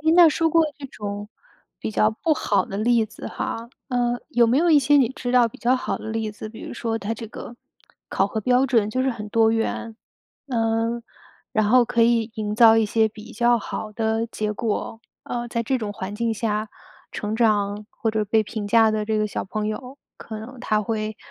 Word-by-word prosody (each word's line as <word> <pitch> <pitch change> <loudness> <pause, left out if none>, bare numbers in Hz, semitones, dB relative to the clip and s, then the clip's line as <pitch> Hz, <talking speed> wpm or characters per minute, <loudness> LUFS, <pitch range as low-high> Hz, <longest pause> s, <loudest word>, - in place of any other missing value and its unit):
那 345 -2 +8
说 325 +1 +1
过 330 0 +4
这 285 - -7
种， 205 -2 -6 0.5
比 - - -4
较 215 0 +3
不 315 +8 0
好 200 -9 +1
的 195 - -6
例 230 +1 +3
子 220 +2 -9
哈， 230 +1 -4 0.2
呃， 245 -1 0
有 240 -5 +4
没 250 +4 +3
有 340 +2 +3
一 300 -2 +7
些 285 +2 +4
你 250 -4 +4
知 245 -1 -4
道 245 -2 +5
比 - - -13
较 250 +2 +2
好 255 - -2
的 220 - -7
例 220 -1 -2
子？ 215 +1 -8
比 220 - -11
如 - - -7
说 230 -1 -2
它 220 +1 -3
这 225 0 -8
个 235 +2 -9 0.5
考 - - +2
核 220 - -3
标 250 +4 +3
准 230 -6 +2
就 255 +4 -1
是 265 - +1
很 215 -3 -5
多 225 0 +4
元， 225 0 -2 0.5
呃， 230 -1 0 0.5
然 215 -1 +2
后 250 +2 +6
可 235 - +1
以 230 -1 +3
营 210 -1 -3
造 225 -1 +7
一 225 - +3
些 220 +1 +2
比 215 0 -12
较 240 +1 +3
好 215 0 -5
的 220 +1 0
结 215 -2 -3
果， 225 +1 -3 0.2
呃， 240 0 -4
在 235 0 -1
这 260 +3 0
种 215 -4 -4
环 195 +1 -6
境 230 +1 0
下 215 -1 -2 0.4
成 210 +1 -3
长， 210 -2 +1
或 225 - -2
者 215 -1 0
被 220 +2 +3
评 210 0 -5
价 225 +1 +5
的 215 0 -1
这 220 0 0
个 215 - +1
小 - - -3
朋 210 +2 -3
友， 255 +5 -6 0.2
可 220 -1 -7
能 245 +3 -10
他 215 -4 +1
会 215 0 -3
225 Hz, 230 characters per minute, -23 LUFS, 215-240 Hz, 0.5 s, 那